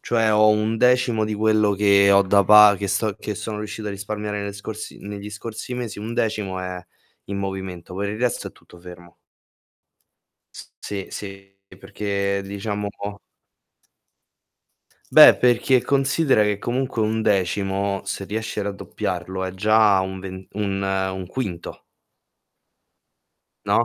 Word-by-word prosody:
Cioè 115 -2 +1
ho 105 0 +5
1/10 115 +2 +2
di 110 - -3
quello 110 -1 +2
che 100 0 +4
ho 100 0 +6
da 100 +1 +3
pa 105 +1 +8
che 100 - -3
sto 105 +1 0
che 105 - -5
sono 105 +2 -5
riuscito 105 0 -6
a - - -3
risparmiare 105 +1 -4
nelle 100 0 -4
scorsi 105 +2 -8
negli 100 0 -7
scorsi 110 +4 -7
mesi, 120 -4 -5
1/10 105 -3 -2
è 90 -1 -6 0.4
in 100 - -5
movimento, 95 -2 -6
poi 100 +2 -2
il 105 - -6
resto 125 -1 -1
è - - -17
tutto 85 - -19
fermo. 90 -1 -13 1.4
S - - -11
sì, 100 -2 -6
sì. 100 -1 -9
E 95 - -14
perché 100 0 -2
diciamo 100 +1 -4 2.2
Beh, - - +9
perché 125 +1 +3
considera 140 -2 +2
che 105 -1 0
comunque 125 +1 -2
1/10, 100 -2 0
se 100 0 -4
riesci 110 +1 -4
a - - -3
raddoppiarlo 95 -2 -4
è 95 0 -3
già 105 0 +4
un 95 0 -5
ven 95 0 -8
un 100 -1 -2
un 95 -1 -2
quinto. 90 -5 -6 1.8
No? 120 - +2
100 Hz, 140 wpm, -22 LUFS, 95-110 Hz, 2.2 s, Beh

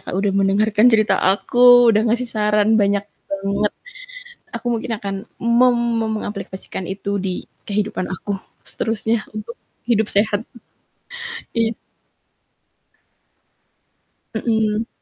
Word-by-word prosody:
Kak, - - -5
udah 195 0 +1
mendengarkan 210 +3 +3
cerita 215 -1 +4
aku 245 +4 +6
udah 215 +1 +3
ngasih 240 +3 +1
saran 210 -1 +2
banyak 200 0 +2 0.2
banget, 200 +1 -1 0.8
aku - - -7
mungkin 225 +1 -4
akan 195 -1 -4 0.2
mem 240 +1 +4 0.4
mengaplikasikan 195 -2 -5
itu 200 +1 -3
di 185 -1 -4 0.2
kehidupan 200 -2 -2
aku 200 +2 -4 0.3
seterusnya 225 0 -1
untuk 215 +2 -7 0.3
hidup 220 -3 +2
sehat, 205 +1 +1 1.1
iya. 230 -1 +1 2.6
Mhm. 220 -1 0
210 Hz, 100 wpm, -20 LUFS, 200-230 Hz, 2.6 s, aku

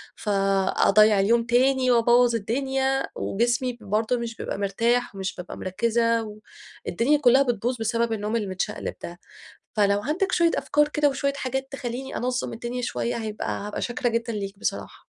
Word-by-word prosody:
فأضيَّع 195 +1 +3
اليوم 230 +4 +3
تاني 255 +2 +3
وابوَّظ 240 0 +4
الدنيا، 265 +4 -1
وجسمي 240 +3 -1
برضه 215 +4 0
مش 235 -1 -5
بيبقى - - -5
مرتاح 230 +4 0
ومش 190 -1 -4
بابقى 180 - -8
مركزّة 230 +4 0
و 210 -1 -9 0.5
الدنيا 240 +11 +2
كلها 265 -1 +5
بتبوظ 245 0 -1
بسبب 230 +1 0
النوم 215 +1 -2
المتشقلِب 210 -1 -3
ده، 175 +1 -7 0.6
فلو 200 -1 +3
عندك 350 - -1
شوية 340 -1 +4
أفكار 295 0 +2
كده 295 -1 +2
وشوية 280 0 -1
حاجات 265 0 -3
تخليني 260 0 -5
أنظَّم 250 0 -2
الدنيا 240 +2 -5
شوية، 120 - -2
هيبقى 220 -2 -4 0.2
هابقى 210 - -5
شاكرة 245 +1 -1
جدًا 230 0 -2
ليك 200 -2 -5
بصراحة. - - -4
235 Hz, 150 wpm, -25 LUFS, 210-255 Hz, 0.6 s, كلها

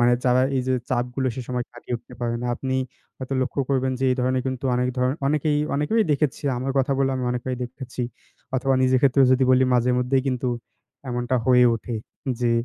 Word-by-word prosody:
মানে 120 0 +5
যারা 125 0 +4
এই 130 - +1
যে 130 - +3 0.2
চাপগুলো 125 +2 0
সে 130 - -3
সময় 125 -1 -2
কাটিয়ে 120 0 -6
উঠতে - - -15
পারে 120 -1 -1
না, - - -2
আপনি 130 -1 -3 0.4
হয়তো 130 +1 -4
লক্ষ্য 140 +2 -2
করবেন 130 -1 +1
যে 135 - +1
এই 125 - +1
ধরনের 130 0 +1
কিন্তু 130 0 -3
অনেক 125 +1 +1
ধরণ 125 +1 +2
অনেকেই, 150 0 +1 0.2
অনেকেই 185 +10 +2
দেখেছি 145 0 0 0.2
আমার 135 +2 -2
কথা 135 +1 +2
বললে 135 -1 +2
আমি 125 - -2
অনেককেই 125 +1 -3
দেখেছি। 125 0 -6 0.5
অথবা 135 +1 +1
নিজের 130 0 +4
ক্ষেত্রেও 135 -1 +5
যদি 130 0 +3
বলি 130 0 +5
মাঝেমধ্যেই 125 +2 +2
কিন্তু 125 0 -1 0.6
এমনটা 120 +1 -1
হয়ে 125 -1 +6
ওঠে। 115 +1 -5 0.5
যে 120 - +2
130 Hz, 195 wpm, -24 LUFS, 125-135 Hz, 0.6 s, হয়ে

